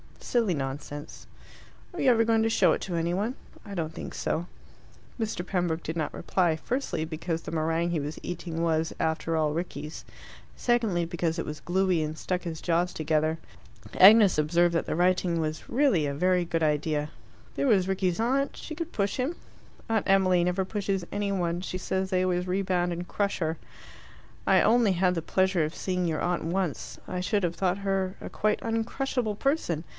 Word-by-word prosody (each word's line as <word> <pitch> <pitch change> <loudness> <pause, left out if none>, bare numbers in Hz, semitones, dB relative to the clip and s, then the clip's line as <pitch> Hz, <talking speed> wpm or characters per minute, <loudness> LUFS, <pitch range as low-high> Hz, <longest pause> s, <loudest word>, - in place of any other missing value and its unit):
"Silly 230 -6 +1
nonsense." 145 +1 -6 0.7
"Are 350 - -7
you 270 - +4
ever 230 -2 +5
going 225 0 +3
to 225 - +2
show - - +4
it - - 0
to 180 - -3
any 170 +1 0
one?" 210 +7 -1 0.3
"I 200 -2 -7
don't 160 -2 -3
think - - -7
so." 170 +2 -2 0.7
Mr. 215 -6 -2
Pembroke 175 -3 -1
did 160 +2 -4
not 155 - -2
reply, 175 -4 +1
firstly, 200 - -2
because 165 +1 -3
the - - -7
meringue 165 +1 0
he 170 - 0
was 150 +2 -4
eating 170 -1 -4
was, 160 -1 +1
after 160 0 0
all, 155 -2 +2
Rickie's; 155 -1 -5 0.5
secondly, 225 -8 +1
because 170 -1 -2
it 165 - -2
was 150 0 -6
gluey 185 -1 +1
and 155 0 -3
stuck 180 +1 -2
his 165 -3 -5
jaws 175 +1 +1
together. 155 +1 0 0.6
Agnes 205 -1 +8
observed 170 +3 +3
that 165 - 0
the - - -2
writing 180 -1 +2
was 155 -1 -3
really 240 - +3
a 140 - -1
very 180 +4 +2
good 165 -1 -1
idea: 150 0 0 0.5
there 280 - 0
was 195 -6 +4
Rickie's 185 -1 0
aunt, 270 +4 +1
she 315 - -7
could 335 +1 -5
push 200 -1 0
him. 270 +7 -1 0.5
"Aunt 220 -2 +1
Emily 185 -2 +4
never 180 +2 +1
pushes 195 -2 -2
any 205 0 -1
one; 175 -2 -1
she 185 0 -4
says 190 +1 -2
they 185 -1 +2
always 180 0 0
rebound 180 -2 0
and 175 +1 -5
crush 200 -1 -1
her." 160 -1 -1 0.9
"I - - +6
only 225 -3 +4
had 180 0 +2
the 165 - -2
pleasure 190 -1 +2
of 155 - -6
seeing 180 -1 -1
your 160 -2 -1
aunt 175 -2 -1
once. 175 -2 -2
I 180 - -3
should 200 +2 0
have 175 -1 0
thought 185 +2 0
her 195 -1 -1
a - - -6
quite 215 0 0
uncrushable 225 0 -1
person. 240 - 0
180 Hz, 190 wpm, -27 LUFS, 165-200 Hz, 0.9 s, Agnes